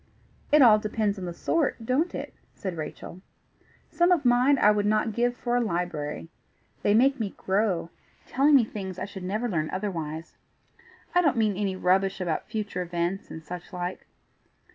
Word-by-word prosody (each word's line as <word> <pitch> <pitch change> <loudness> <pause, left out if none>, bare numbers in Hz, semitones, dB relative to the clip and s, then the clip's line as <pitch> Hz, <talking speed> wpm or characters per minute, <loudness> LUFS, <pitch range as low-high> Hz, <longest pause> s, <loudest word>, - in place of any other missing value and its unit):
"It 300 -1 +7
all 215 -3 +7
depends 210 -1 -1
on 185 - -5
the 175 - -4
sort, 285 - -1
don't 285 +9 0
it?" - - -6 0.2
said 190 -3 -5
Rachel. 165 +3 -7 0.7
"Some 345 +1 +3
of 335 -7 +2
mine 250 +3 +4
I 210 - +5
would 205 -1 +1
not 215 +1 +1
give 240 +2 0
for 240 -1 -1
a 245 - +3
library. 170 -7 -3 0.5
They 205 - +3
make 270 +4 +4
me 210 -4 -3
grow, 190 -4 0 0.3
telling 285 +3 +3
me 250 -5 +6
things 190 -4 -6
I 185 - -3
should 195 -1 -9
never 215 +6 -2
learn 155 -7 -1
otherwise. 165 -5 -5 0.8
I 355 - +5
don't 290 -7 +2
mean 215 -3 +2
any 195 -1 -1
rubbish 190 +1 +1
about 170 -4 -2
future 210 -4 -3
events, 175 +2 -3
and 160 - -8
such 175 +3 -8
like. 180 0 -5
205 Hz, 175 wpm, -26 LUFS, 180-240 Hz, 0.8 s, It